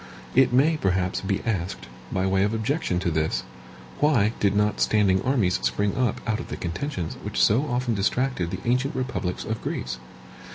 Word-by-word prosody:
It 130 0 +5
may, 145 +6 +4
perhaps, 95 -5 0
be 100 0 -1
asked, 95 - -2 0.2
by 95 0 0
way 95 0 +2
of 105 +2 +1
objection 110 - -1
to 85 - 0
this, 80 0 0 0.6
why 120 -8 +3
did 100 -1 +2
not 105 0 +1
standing 100 -3 +3
armies 110 - +1
spring 65 +12 0
up 125 -5 0
out 110 -1 0
of - - -6
the - - -5
contentions 90 - -4
which - - -3
so 130 +8 +4
often 125 -2 0
distracted 105 -2 0
the - - -5
ancient 125 +3 +1
republics 125 -8 -3
of 110 0 -3
Greece? 65 - -4
105 Hz, 175 wpm, -25 LUFS, 95-125 Hz, 0.6 s, It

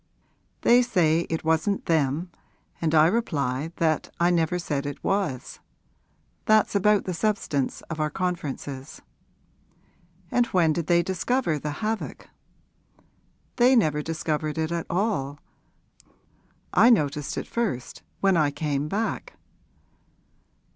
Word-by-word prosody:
'They 240 +1 +6
say 175 -10 +2
it 160 - -2
wasn't 160 +5 +1
them, 160 +2 0 0.5
and 160 -1 +1
I 155 0 +7
reply 155 - 0
that 160 -2 0
I 175 +1 +3
never 170 0 +1
said 145 -5 -3
it 145 - -7
was. 190 -11 -2 0.9
That's 215 -1 +4
about 205 0 +3
the 185 - -2
substance 165 -8 -1
of 165 -1 -7
our 155 0 +1
conferences.' 150 -5 -4 1.3
'And 245 -1 +2
when 170 -9 +2
did 165 -1 -3
they 170 0 +4
discover 190 - 0
the 150 +7 -4
havoc?' 220 +1 -4 1.3
'They 250 +1 +5
never 155 -10 +2
discovered 155 -1 -2
it 160 0 -1
at 170 -1 -3
all. 170 -7 -1 1.3
I 235 - +6
noticed 150 - +1
it - - -3
first 215 - -3 0.2
when 195 -1 +4
I 155 -3 +3
came 145 0 -2
back.' 215 +7 -3
165 Hz, 120 wpm, -25 LUFS, 150-195 Hz, 1.3 s, I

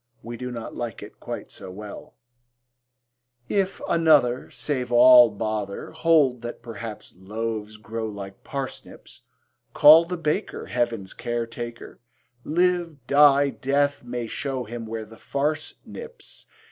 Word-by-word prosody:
We 120 +1 -6
do 125 +1 -5
not 120 -2 -6
like 120 -2 -5
it - - -13
quite - - -7
so 95 - -9
well: 105 +2 -10 1.3
If 195 -1 0
another 150 -7 +3
Save 130 -4 -3
all 120 0 +8
bother, 105 -1 -4
Hold 145 -7 +3
that 120 0 -7
perhaps 115 -1 -8
loaves 110 +2 -5
grow 110 +1 -5
like 100 -2 -8
parsnips: 135 -2 -7 0.5
Call 155 +3 +9
the 180 +1 -4
baker 165 +5 -2
Heaven's 115 -6 -2
care 120 -1 -3
taker, 120 0 -8 0.4
Live, 170 -4 0
die; 140 0 +5
Death 140 +4 0
may 120 -1 -4
show 130 +2 -3
him 115 0 -7
where 110 0 -5
the 110 +1 -15
farce 150 +3 -2
nips. 475 +1 -9
120 Hz, 130 wpm, -25 LUFS, 115-145 Hz, 1.3 s, Call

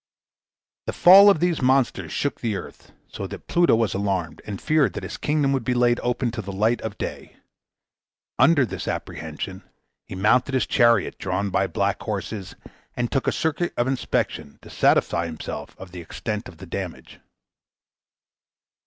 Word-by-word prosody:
The - - -2
fall 195 +3 +8
of 195 - +4
these 175 -2 0
monsters 130 -2 +1
shook 145 - -2
the 115 -3 -1
earth, - - -9 0.2
so - - -6
that - - -9
Pluto 175 -7 +3
was 115 -2 0
alarmed, 95 -5 -2
and 100 -3 -5
feared 155 -2 +2
that - - -6
his - - -6
kingdom 145 -2 +1
would 135 -3 -1
be 125 +2 0
laid 120 0 +3
open 120 0 -1
to 115 -1 -4
the 100 -1 -7
light 110 +4 +1
of 110 -2 -5
day. - - -6 1.0
Under 155 -5 +5
this 95 -4 -6
apprehension, - - -5 0.5
he - - -7
mounted 125 +8 +2
his 130 - +2
chariot, 115 -5 +2
drawn 100 -1 -2
by 95 - +1
black 85 - -1
horses, 100 -4 -5 0.4
and 120 -1 -2
took 135 - -1
a - - +4
circuit 160 +2 -1
of 120 - +2
inspection 130 - -2
to - - -12
satisfy 85 0 +2
himself 80 -2 -7
of 95 -2 -11
the 90 -1 -8
extent 105 +6 -5
of 90 - -15
the - - -10
damage. - - -7
120 Hz, 170 wpm, -23 LUFS, 100-135 Hz, 1.0 s, fall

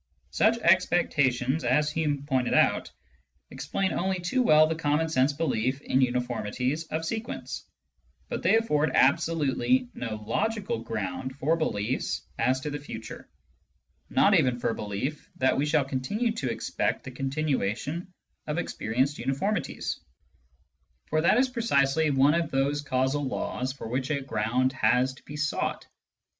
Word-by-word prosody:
Such 225 +1 +3
expectations, 155 - +2
as 150 +5 +2
Hume 150 -3 -1
pointed 130 -3 +1
out, - - +3 0.6
explain 190 -2 -2
only 190 0 -1
too 180 +9 0
well 155 -9 +6
the 160 - 0
common 160 0 0
sense 135 -2 +3
belief 135 -4 -1
in 135 -1 +1
uniformities 125 +3 -1
of 160 +1 -3
sequence, 220 +6 -5 0.6
but - - -4
they - - +3
afFord 155 -9 +1
ab 135 +2 +5
solutely 165 - +1
no 115 -3 -4
logical 210 - -1
ground 115 +3 -4
for 145 +4 +1
beliefs 115 -7 -2 0.2
as 130 +3 +2
to 150 - -4
the 145 - -4
future, 110 -6 -9 0.8
not - - +4
even 125 -2 +3
for - - -1
the - - 0
belief 105 +9 -4
that 130 - +2
we 145 +2 0
shall 150 -2 +2
continue 140 - -1
to 140 - -3
expect 115 - -2
the 130 - -7
continuation 140 - -2 0.4
of 150 +1 -2
experienced 130 -2 -1
uniformities, 150 +3 -2 1.1
for 155 0 +2
that 175 +7 +4
is 260 +1 +4
precisely 160 - +2
one 140 +1 +4
of 170 0 0
those 140 +2 0
causal 135 +1 0
laws 130 0 -2
for 130 -3 -8
which 130 +3 -2
a 150 -2 0
ground 125 +1 0
has 125 +1 +2
to - - -17
be 145 - -8
sought. 150 0 -2
140 Hz, 150 wpm, -27 LUFS, 130-160 Hz, 1.1 s, well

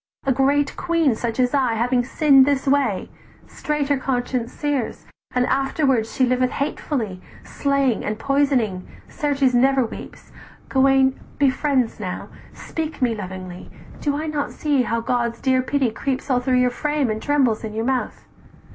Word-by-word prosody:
A 270 - +2
great 275 +2 +2
queen 335 -6 +1
such 230 +1 -3
as 250 +1 +2
I 255 -5 +2
Having 245 +2 +1
sinn'd 270 0 +5
this 280 -2 +1
way, 270 -8 +1 0.3
straight 300 -2 -3
her 285 - +3
conscience 245 -2 -2
sears; 290 -6 -3 0.3
"And 250 0 +3
afterwards 270 -4 +1
she 260 - +2
liveth 255 0 +1
hatefully, 245 -9 -3 0.2
Slaying 275 -4 0
and 215 0 -2
poisoning, 265 -9 0 0.2
certes 280 -3 0
never 265 +1 +3
weeps: 225 - -10 0.4
Gauwaine 265 0 +3 0.2
be 280 -2 +4
friends 260 -5 0
now, 185 -3 -5 0.2
speak 320 -1 -5
me 240 -2 +2
lovingly, 185 -3 -7 0.3
"Do 285 -1 -1
I 310 - -3
not 300 -2 -2
see 290 -3 +1
how 230 -1 -1
God's 235 0 -1
dear 260 -1 +2
pity 260 -2 0
creeps 265 +4 -3
All 250 - +3
through 255 0 +1
your 250 0 +3
frame, 295 -1 -1
and 215 0 -4
trembles 270 -7 +1
in 215 -1 -5
your 225 +1 -1
mouth? 260 -1 -2
260 Hz, 160 wpm, -22 LUFS, 235-280 Hz, 0.4 s, sinn'd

